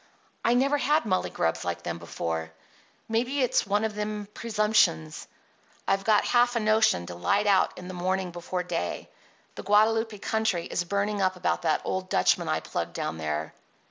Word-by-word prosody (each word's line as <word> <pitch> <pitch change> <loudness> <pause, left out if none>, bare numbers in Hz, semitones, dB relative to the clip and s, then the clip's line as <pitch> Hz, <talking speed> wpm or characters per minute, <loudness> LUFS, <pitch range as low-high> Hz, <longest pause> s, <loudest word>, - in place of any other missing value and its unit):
I 235 - +3
never 275 +3 +2
had 300 +3 +2
mullygrubs 185 - -1
like - - -3
them 85 0 -4
before. 80 -1 -4 0.6
Maybe 250 +5 0
it's 245 - +1
one 205 +2 +1
of 220 -1 -1
them 210 0 -4
presumptions. 210 - +1 0.6
I've 195 0 +1
got 210 0 +3
half 245 0 +3
a - - +2
notion 215 - +3
to 85 - -7
light 90 - +1
out 195 -2 +3
in 180 - -8
the 185 - -6
morning 185 +1 -1
before 175 +1 -4
day. 90 - -4 0.4
The - - -7
Guadalupe 220 +1 +2
country 220 -4 -1
is 175 - -2
burning 200 +2 -1
up 185 -1 +1
about 180 - -1
that 160 -2 +1
old 185 0 -3
Dutchman - - +2
I - - 0
plugged - - -4
down 80 - -4
there." 75 0 -3
200 Hz, 175 wpm, -27 LUFS, 175-220 Hz, 0.6 s, I